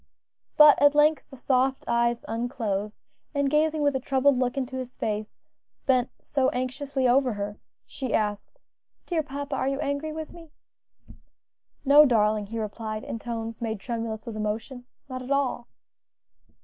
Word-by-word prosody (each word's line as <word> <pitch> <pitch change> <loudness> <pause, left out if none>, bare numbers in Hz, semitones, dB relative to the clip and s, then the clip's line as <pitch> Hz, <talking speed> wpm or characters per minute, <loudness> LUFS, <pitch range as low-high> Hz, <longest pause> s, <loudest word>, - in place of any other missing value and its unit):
But 300 -1 +8
at 290 0 +6
length 300 +1 +4
the 270 - -12
soft 260 +1 +1
eyes 235 0 +1
unclosed, 220 -3 -3 0.3
and 280 -1 +1
gazing 305 0 +2
with 285 -1 +2
a - - +1
troubled 265 0 +2
look 250 0 0
into 260 -1 -3
his 255 -1 -7
face, 215 0 -3 0.5
bent 255 -2 +2
so 270 -2 0
anxiously 260 +1 -2
over 255 0 +3
her, 205 0 -5 0.3
she 260 -4 -5
asked, 210 -1 -1 0.5
"Dear 335 -3 0
papa, 285 -1 -5
are 265 - -1
you 275 0 -1
angry 290 +1 -2
with 315 0 -6
me?" 335 -2 -13 1.4
"No, 285 +2 +8
darling," 215 -5 +2
he 230 +3 -6
replied 215 0 -4
in 230 - -5
tones 230 -1 -5
made 220 -2 -2
tremulous 225 0 -4
with 230 -3 -6
emotion, 220 +4 -4 0.2
"not 255 -1 -6
at 255 - -9
all." 275 -4 0
255 Hz, 155 wpm, -26 LUFS, 225-280 Hz, 1.4 s, But